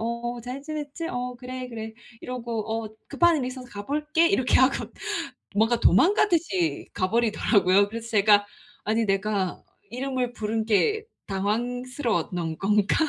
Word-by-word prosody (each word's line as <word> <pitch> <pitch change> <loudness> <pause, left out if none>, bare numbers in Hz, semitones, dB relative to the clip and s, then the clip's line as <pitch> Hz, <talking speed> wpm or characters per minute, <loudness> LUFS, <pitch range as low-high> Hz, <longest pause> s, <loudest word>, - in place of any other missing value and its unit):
어어 235 +1 -3
잘 250 +4 -6
지냈지? 305 +1 -5
어 250 -2 -3
그래 255 0 -6
그래." 225 -2 -6 0.3
이러고 230 -3 -3
"어 - - -8 0.2
급한 345 -2 +4
일이 260 - -1
있어서 255 0 -8
가 205 -3 -7
볼게." 305 +3 +2
이렇게 260 -9 +3
하고 260 +1 +2 0.7
뭔가 225 +3 +3
도망가듯이 230 - +3
가 185 - 0
버리더라고요. 205 -3 +3
그래서 230 +1 -6
제가 205 -1 +5 0.4
'아니 220 +2 +1
내가 195 -2 0 0.3
이름을 255 0 -2
부른 220 0 -2
게 425 - +2 0.2
당황스러웠던 220 - -2
건가?' 205 0 +2
235 Hz, 305 characters per minute, -26 LUFS, 210-255 Hz, 0.7 s, 제가